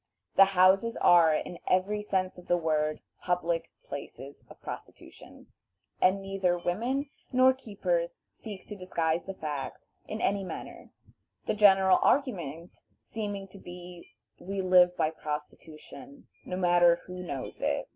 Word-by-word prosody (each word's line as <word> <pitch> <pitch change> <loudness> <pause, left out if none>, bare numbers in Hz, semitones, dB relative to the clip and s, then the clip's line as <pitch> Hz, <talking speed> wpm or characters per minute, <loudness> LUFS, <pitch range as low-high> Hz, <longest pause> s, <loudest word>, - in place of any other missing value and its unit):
The 195 -1 +5
houses 195 +5 +4
are, 170 -2 +6
in 170 +2 -3
every 195 +3 +1
sense 185 -3 -2
of 180 - -16
the 175 - +3
word, 155 -2 0 0.2
"public" 170 -2 -1
places 140 0 -9
of - - -14
prostitution, - - -11 0.5
and 195 +2 +3
neither 195 -2 0
women 240 +11 -2 0.2
nor 255 +1 +5
keepers - - -2 0.2
seek 205 -4 -9
to 210 - -8
disguise 170 -3 -1
the 195 - -6
fact 150 -5 -6 0.2
in 215 - -5
any 200 -1 0
manner, 185 - -8 0.6
the - - 0
general 195 -3 +5
argument 175 - 0 0.3
seeming 205 -3 -5
to 195 - -13
be, 175 - -11 0.2
"We 195 0 -4
live 180 -1 +5
by 155 - +1
prostitution, 155 - -8 0.2
no 180 - -4
matter 175 -1 +5
who 180 0 -8
knows 140 -7 -6
it." - - -1
185 Hz, 135 wpm, -29 LUFS, 170-205 Hz, 0.6 s, are